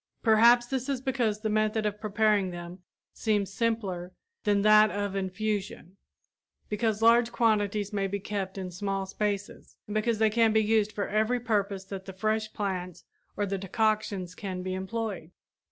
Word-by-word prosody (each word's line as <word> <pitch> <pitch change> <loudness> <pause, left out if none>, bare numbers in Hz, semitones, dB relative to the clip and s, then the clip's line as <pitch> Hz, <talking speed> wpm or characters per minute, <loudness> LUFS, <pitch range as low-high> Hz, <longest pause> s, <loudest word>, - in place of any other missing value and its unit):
Perhaps 235 +2 +6
this 260 +1 -3
is 275 -2 0
because 240 -5 -1
the 220 - -1
method 215 0 +1
of 210 0 -2
preparing 210 -2 +2
them 175 +1 -8 0.3
seems 205 -3 0
simpler 200 -7 -2 0.3
than 205 -1 +2
that 215 0 +7
of 205 -1 -3
infusion, 195 -1 -3 0.7
because 215 0 -1
large 235 +1 +5
quantities 210 -3 +1
may 200 -1 0
be 200 +1 -3
kept 195 -1 -4
in 185 -1 -5
small 195 +1 -2
spaces, 205 +1 -4
and 210 - -7
because 215 +1 +1
they 220 0 +3
can 225 0 +3
be 220 - +5
used 215 -1 +2
for 205 - -3
every 220 +4 +1
purpose 205 -5 -1
that 190 -1 -7
the 190 - -8
fresh 215 +2 -1
plants 185 -4 -4 0.3
or 205 - +1
the 195 0 -3
decoctions 200 -2 -1
can 185 -2 -5
be 185 0 -3
employed. 190 -2 -4
210 Hz, 165 wpm, -28 LUFS, 195-220 Hz, 0.7 s, that